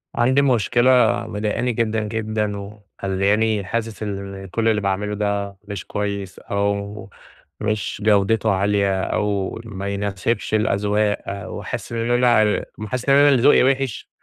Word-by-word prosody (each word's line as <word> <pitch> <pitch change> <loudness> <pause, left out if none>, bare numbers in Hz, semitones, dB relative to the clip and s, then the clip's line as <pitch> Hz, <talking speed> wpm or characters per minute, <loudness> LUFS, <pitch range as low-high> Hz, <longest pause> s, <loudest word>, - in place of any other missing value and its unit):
عندي 130 +4 +3
مشكلة 120 -1 +3 0.4
مضايقاني 110 +4 -1
جدًا، 110 -1 0
جدًا، 110 -1 -2
ومخليانى 100 +1 -1
حاسس 115 +2 -3
إن 100 -1 -5
كل 110 +5 -1
اللي 110 -2 +2
باعمله 100 +1 -1
ده 100 -1 -2
مش 100 -3 -6
كويّس 100 -2 -4
أو 100 0 -3 0.5
مش 105 -1 -2
جودته 110 +1 +3
عالية 100 0 +1
أو 100 -1 -1
ما 100 -3 -6
يناسبش 100 +3 -2
الأذواق، 105 -2 0
وحاسس - - -6
إن 115 +1 -1
أنا 120 -4 +3 0.2
حاسس 125 +4 -3
إن 135 - +6
أنا 145 +1 +6
اللي 135 -4 +3
ذوقي 140 - +6
وحش، 135 -2 0
105 Hz, 130 wpm, -21 LUFS, 100-115 Hz, 0.5 s, إن